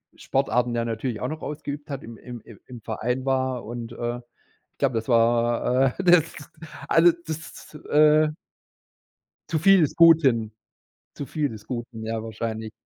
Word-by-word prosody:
Sportarten 125 Hz, -3 st, 0 dB
ja 115 Hz, 0 st, -1 dB
natürlich 115 Hz, 0 st, -3 dB
auch 125 Hz, -, -2 dB
noch 155 Hz, 0 st, -6 dB
ausgeübt 150 Hz, 0 st, -6 dB
habe, 140 Hz, -3 st, -6 dB
im 115 Hz, -1 st, -10 dB
im 120 Hz, -3 st, -10 dB
im 110 Hz, -, -15 dB
im 120 Hz, -3 st, -10 dB
Verein 125 Hz, +4 st, -3 dB
war. 130 Hz, -3 st, -1 dB
Und 120 Hz, 0 st, -7 dB
äh, 120 Hz, 0 st, -3 dB, 0.6 s
ich -, -, -47 dB
glaube, 135 Hz, -3 st, +1 dB
das 115 Hz, +1 st, -3 dB
war, 120 Hz, +2 st, +2 dB
äh, -, -, -2 dB
das 175 Hz, -2 st, +4 dB, 0.6 s
also 170 Hz, +1 st, +5 dB
das, 160 Hz, 0 st, -8 dB, 0.2 s
äh 150 Hz, +1 st, +5 dB, 1.2 s
zu 160 Hz, -, 0 dB
viel 195 Hz, +1 st, +6 dB
des 150 Hz, -, 0 dB
Guten, 140 Hz, -10 st, +5 dB, 0.6 s
zu 140 Hz, -, -6 dB
viel 150 Hz, -3 st, -1 dB
des 110 Hz, -3 st, -11 dB
Guten, 120 Hz, -2 st, -6 dB
ja, 110 Hz, 0 st, -3 dB
wahrscheinlich. 110 Hz, 0 st, -5 dB
125 Hz, 160 wpm, -24 LUFS, 115-150 Hz, 1.2 s, viel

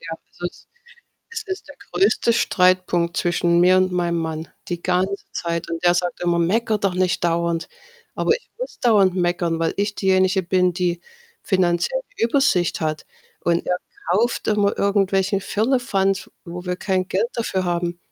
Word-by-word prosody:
Ja, 165 Hz, 0 st, -6 dB
es -, -, -25 dB
ist 175 Hz, -, -6 dB, 0.6 s
es 445 Hz, -1 st, -4 dB
ist 375 Hz, -5 st, -5 dB
der 290 Hz, -, -12 dB, 0.2 s
größte 200 Hz, +6 st, +3 dB
Streitpunkt 180 Hz, -5 st, +2 dB
zwischen 175 Hz, 0 st, +2 dB
mir 180 Hz, +1 st, +6 dB
und 185 Hz, 0 st, +2 dB
meinem 175 Hz, -1 st, 0 dB
Mann 160 Hz, 0 st, -4 dB, 0.2 s
die 175 Hz, -1 st, -4 dB
ganze 185 Hz, +2 st, +1 dB, 0.2 s
Zeit 170 Hz, -1 st, -3 dB
und 165 Hz, 0 st, -4 dB
der 175 Hz, -, +5 dB
sagt 175 Hz, 0 st, -1 dB
immer: 170 Hz, -1 st, +1 dB
„Mecker 215 Hz, +6 st, +1 dB
doch 195 Hz, -2 st, 0 dB
nicht 180 Hz, -1 st, 0 dB
dauernd.“ 170 Hz, -1 st, 0 dB, 0.5 s
Aber 455 Hz, -, +2 dB
ich -, -, -9 dB
muss -, -, -6 dB
dauernd 205 Hz, -6 st, +4 dB
meckern, 175 Hz, -2 st, 0 dB
weil 165 Hz, -1 st, +1 dB
ich 205 Hz, +1 st, -1 dB
diejenige 190 Hz, 0 st, +2 dB
bin, 180 Hz, 0 st, +2 dB
die 175 Hz, -1 st, -1 dB, 0.4 s
finanziell 185 Hz, -, +1 dB, 0.2 s
die -, -, +2 dB
Übersicht 235 Hz, -, +2 dB
hat 155 Hz, -1 st, -2 dB, 0.4 s
und 170 Hz, 0 st, +1 dB
er 180 Hz, -, 0 dB, 0.3 s
kauft 230 Hz, +5 st, +1 dB
immer 205 Hz, -1 st, +2 dB
irgendwelchen 195 Hz, -1 st, +1 dB
Firlefanz, 205 Hz, -4 st, 0 dB, 0.2 s
wo 175 Hz, 0 st, -7 dB
wir 180 Hz, 0 st, -1 dB
kein 185 Hz, -1 st, -1 dB
Geld 190 Hz, +5 st, 0 dB
dafür 195 Hz, -5 st, -1 dB
haben. 175 Hz, 0 st, -1 dB
185 Hz, 165 wpm, -22 LUFS, 175-200 Hz, 0.6 s, mir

